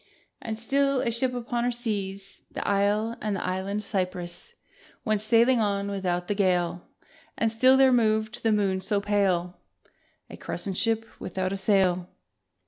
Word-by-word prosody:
And 220 -1 -4
still, 275 +3 +1
a 235 - 0
ship 250 +3 0
upon 240 0 -2
her 245 - +1
seas, 200 -5 -4
The - - -5
isle 205 +3 +1
and 210 -2 -1
the 190 - -4
island 190 +3 -2
cypresses 185 - -4 0.5
Went 215 -3 +1
sailing 235 +3 +4
on 200 -2 0
without 180 -3 -2
the - - 0
gale: 180 -3 0 0.5
And 225 -1 +1
still 255 +4 +5
there 265 -1 +5
moved 220 0 +1
the 225 - +2
moon 195 -3 +1
so 200 +2 0
pale, 195 -4 0 0.7
A - - -10
crescent 195 -3 -4
ship 225 -1 +1
without 185 +1 -3
a - - -1
sail 190 -2 +2
205 Hz, 155 wpm, -26 LUFS, 190-230 Hz, 0.7 s, still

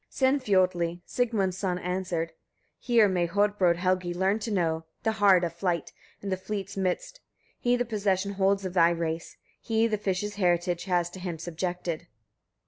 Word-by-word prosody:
Sinfiotli, 185 -10 +1
Sigmund's 205 -7 0
son, 185 -3 -1
answered: 180 -2 -2
18. 160 - -30 0.4
Here 235 -4 +4
may 180 -3 +1
Hodbrodd 200 -2 +2
Helgi 180 0 0
learn 190 +4 +1
to 225 - -4
know, 165 -5 0 0.2
the 220 - +2
hard 200 -4 +5
of 170 -1 -1
flight, 170 -2 -2 0.3
in 200 - -3
the 185 - 0
fleet's 200 0 -5
midst: 200 - -2 0.4
he 245 0 +2
the 245 0 0
possession 200 -3 0
holds 195 0 +1
of 185 - -4
thy 170 -2 +5
race; 165 -1 -3 0.2
he 225 0 +1
the 215 -2 0
fishes' 205 +1 -2
heritage 175 -2 +1
has 175 -2 +1
to 185 - -9
him 175 -2 -4
subjected. 175 0 -4
185 Hz, 165 wpm, -28 LUFS, 175-205 Hz, 0.4 s, hard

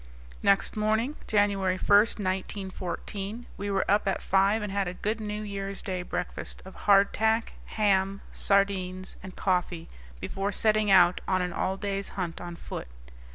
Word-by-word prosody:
Next 200 -1 +4
morning, 220 +6 +1
January 200 -3 +2
1, - - -5
1914, 200 +1 0
we 205 +1 -4
were 195 -1 +1
up 205 +1 +2
at 195 - +1
five 200 +3 +3
and 205 - -4
had 200 -1 0
a 180 - -4
good 215 +4 -2
New 210 0 -4
Year's 200 -1 -5
Day 185 -2 -3
breakfast 180 0 -5
of 190 - -10
hardtack, 220 +3 +3
ham, 195 -2 +1
sardines, 190 -2 0
and 190 0 -10
coffee 180 -3 -1 0.3
before 195 - -3
setting 215 +1 +2
out 180 -2 +6
on 185 -1 +1
an 180 -1 -3
all 190 +1 -1
day's 200 0 -2
hunt 175 -3 -3
on 175 -1 -6
foot. 170 - -7
195 Hz, 155 wpm, -28 LUFS, 185-210 Hz, 0.3 s, out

